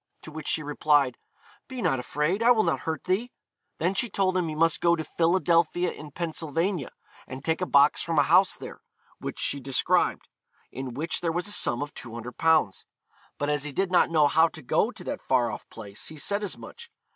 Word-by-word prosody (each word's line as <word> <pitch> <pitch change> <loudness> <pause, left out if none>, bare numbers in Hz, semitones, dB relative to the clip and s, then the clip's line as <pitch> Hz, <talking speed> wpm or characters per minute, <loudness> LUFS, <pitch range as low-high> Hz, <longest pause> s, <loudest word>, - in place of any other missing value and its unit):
To 155 - -10
which 155 -1 -7
she 155 - +1
replied, 145 -3 +2 0.5
'Be 260 -1 -7
not 135 - +1
afraid; 150 - -1
I 235 - +4
will 225 -3 +5
not - - 0
hurt 160 - -3
thee.' 205 +7 -1 0.5
Then 175 +4 0
she 230 +4 0
told 190 -1 0
him 180 -2 +1
he 155 - -4
must 165 0 +2
go 170 0 +4
to 160 - -4
'Philadelphia 170 +1 +1
in 150 - -10
Pennsylvania,' 165 +1 -2 0.3
and 130 +1 -8
take 165 +2 0
a 180 - -1
box 140 +1 +4
from 165 -2 -2
a 145 - +6
house 180 +5 +4
there, - - -10 0.4
(which - - -6
she 140 - -1
described,) 135 -1 +1 0.4
in 130 -1 -6
which 160 +3 -2
there 170 -2 0
was 175 +4 -2
a - - -4
sum 135 -9 +1
of 145 - -9
200_l._ 125 - 0 0.5
But 145 +1 -1
as 145 -1 -1
he 150 - -4
did 190 +5 -1
not 180 - +4
know 155 -3 +4
how 160 +3 +4
to 160 -2 -11
go 120 - +2
to - - -11
that - - -5
far 125 -3 +1
off - - -9
place, 105 -2 -9
he 155 - -10
said 200 +7 -1
as 205 - -3
much. 470 0 -11
160 Hz, 210 wpm, -26 LUFS, 145-180 Hz, 0.5 s, a